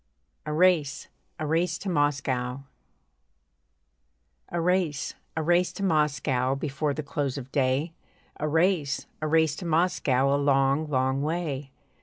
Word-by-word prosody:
A - - -2
RACE, 155 -4 +2 0.3
A 155 - -3
RACE 165 +2 +1
TO 200 - -8
MOSCOW 135 -5 0 1.9
A 175 - -2
race, 170 -4 0 0.2
a 160 - 0
race 175 +2 +3
to 200 - -5
Moscow, 145 -6 +1
Before 140 +1 -2
the 155 - -4
close 140 -1 -2
of 135 -1 -8
day! 140 +4 +1 0.5
A 150 - -1
race, 160 -2 +1 0.2
a 155 - -1
race 160 -1 +3
to 180 - -6
Moscow, 145 -5 +2
A 145 - 0
long, 140 +2 +2
long 130 0 +1
way! 150 -3 -2
150 Hz, 135 wpm, -27 LUFS, 135-165 Hz, 1.9 s, race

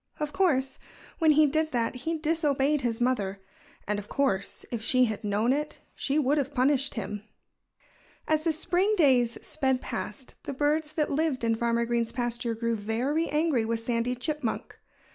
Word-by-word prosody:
Of 300 -1 -3
course, 270 -8 +1 0.4
when 320 -2 +4
he 305 +1 +6
did 310 +2 +1
that 235 -2 0
he 320 +6 -3
disobeyed 300 -3 +1
his 235 -2 -1
mother. 210 -6 0 0.5
And 210 0 0
of 205 - -10
course, 200 -9 -1
if 235 -3 -3
she 255 +2 +3
had 220 -1 -4
known 210 +4 +2
it 300 +2 -3
she 280 +2 -1
would 290 0 +2
have 280 0 -3
punished 275 +1 +2
him. 210 -2 -4 1.1
As 310 0 +2
the 330 - +2
spring 355 +6 +1
days 250 -7 +4
sped 265 -4 0
past, 240 0 -5
the - - -5
birds 300 +2 +1
that 305 -1 0
lived 290 -3 0
in 230 0 +2
Farmer 235 +1 +1
Green's 235 -1 0
pasture 240 -1 -2
grew 230 +1 -1
very 245 +10 -1
angry 300 -5 +2
with 225 0 -1
Sandy 235 +1 0
Chipmunk. 290 -1 -3
260 Hz, 170 wpm, -28 LUFS, 230-300 Hz, 1.1 s, he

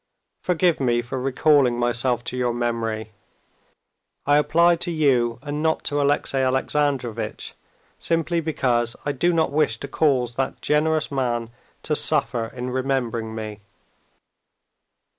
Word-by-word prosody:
Forgive 180 -1 +1
me 120 -3 +1
for 125 +2 -5
recalling 135 -1 +3
myself 120 0 0
to - - -5
your 125 -1 0
memory. 115 -2 -2 1.1
I 145 +1 +4
apply 170 +3 +3
to 175 - -4
you 130 -8 +2
and 145 0 -4
not 160 0 0
to 145 0 0
Alexey 140 -1 +1
Alexandrovitch, 130 -2 -1 0.5
simply 165 +1 0
because 120 -7 0
I 145 - +1
do 160 +6 +1
not 160 -3 +1
wish 145 -6 +1
to - - -6
cause 130 -5 +1
that 135 0 -2
generous 155 +1 +1
man 120 -4 -1 0.3
to 150 - 0
suffer 135 -7 +2
in 125 +1 -6
remembering 125 -4 -2
me. 110 -1 -6
130 Hz, 130 wpm, -23 LUFS, 120-150 Hz, 1.1 s, I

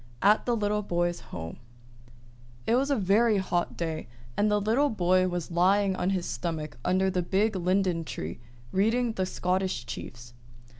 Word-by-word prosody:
AT 210 +4 +4
THE 240 - +2
LITTLE 210 -1 0
BOY'S 175 -3 -1
HOME 80 -1 -8 1.1
It - - +2
was 265 +3 +2
a 280 - +3
very 210 +1 +3
hot 180 -2 -1
day, 160 -2 -3 0.3
and 210 +1 +2
the 210 0 +3
little 230 +8 +2
boy 185 -3 +2
was 175 -2 -3
lying 190 +3 +3
on 185 - 0
his 185 -3 -1
stomach 155 -6 -4
under 190 +1 +2
the 180 - 0
big 200 +4 +1
linden 185 -1 +1
tree, 80 - -6 0.3
reading 230 +5 +2
the 185 -3 -1
"Scottish 185 -9 -1
Chiefs." 120 +1 -8
185 Hz, 160 wpm, -28 LUFS, 175-210 Hz, 1.1 s, AT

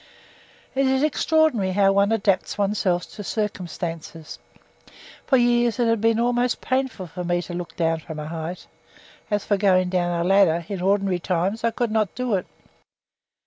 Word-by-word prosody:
It 270 0 +2
is 265 +1 +2
extraordinary 305 - +2
how 195 0 +4
one 200 +2 +3
adapts 200 -4 0
oneself 195 -3 0
to 205 - -8
circumstances. 170 -6 -5 0.9
For 265 - +4
years 240 -1 +2
it 240 - +2
has 230 -1 +2
been 225 +1 +2
almost 245 +1 +1
painful 255 -9 -2
to 180 +2 -6
me 175 0 0
to 175 - -8
look 175 0 -6
down 165 -1 0
from 160 0 -9
a 150 - -5
height; 165 +2 -6 0.6
as 205 -2 -1
for 205 - +1
going 185 -2 +3
down 175 -1 0
a - - 0
ladder, 180 -4 +3
in 195 -3 -4
ordinary 195 -1 +1
times 185 +5 -1
I 230 - +3
could 230 0 -2
not 215 -4 0
do 250 -3 -2
it. 185 -3 -1
200 Hz, 170 wpm, -23 LUFS, 175-230 Hz, 0.9 s, how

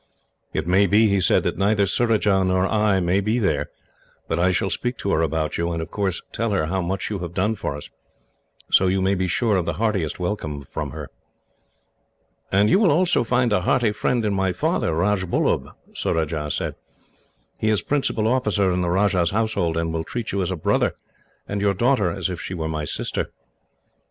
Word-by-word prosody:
"It 80 - -2
may 95 +3 +4
be," 105 +2 +4
he 100 -1 +2
said, - - +3
"that - - -2
neither 100 +1 +3
Surajah 105 -2 +2
nor 95 0 +2
I 105 -2 +2
may 90 +2 +1
be 110 +4 0
there, 95 -11 0 0.6
but 80 - -1
I 90 +2 +3
shall 90 - 0
speak 125 0 -2
to 100 - -2
her 80 - +2
about 80 -1 -1
you, 85 +1 0
and 85 - -2
of 80 0 -6
course 95 -4 -2
tell 115 0 -1
her 100 -6 +1
how 95 +4 -1
much 95 +5 -3
you 100 - -2
have 85 -1 -6
done 105 +4 +1
for 100 -8 -4
us; 75 - -7 0.8
so 95 - +5
you 95 +1 +1
may 95 +1 +2
be 95 -1 0
sure 105 +3 +1
of 90 - -1
the - - 0
heartiest 105 -9 -1
welcome 90 -6 -3
from - - -5
her." - - -8 1.4
"And 100 +2 +4
you 190 - +4
will 210 -5 +4
also 175 -2 +3
find 125 -1 +1
a 95 - +2
hearty 115 +4 +2
friend 115 +2 0
in 105 - +1
my 95 -1 0
father, 85 - 0
Rajbullub," 95 +1 0 0.2
Surajah 80 -2 -1
said. - - -2 0.9
"He 110 - +1
is 105 -4 +1
principal 135 -6 0
officer 105 -6 +2
in 90 - 0
the 90 - 0
Rajah's 90 -2 +2
household, 100 -6 0
and 80 0 -1
will 80 0 -2
treat 120 +5 -4
you 100 - -1
as 90 - -1
a 95 - -1
brother, 80 - +1 0.5
and 100 0 -3
your 100 -1 +2
daughter 120 -3 +2
as 85 - -2
if 90 -2 -5
she 95 - -5
were 80 -2 -3
my 75 -1 -3
sister." - - -3
95 Hz, 205 wpm, -23 LUFS, 85-105 Hz, 1.4 s, so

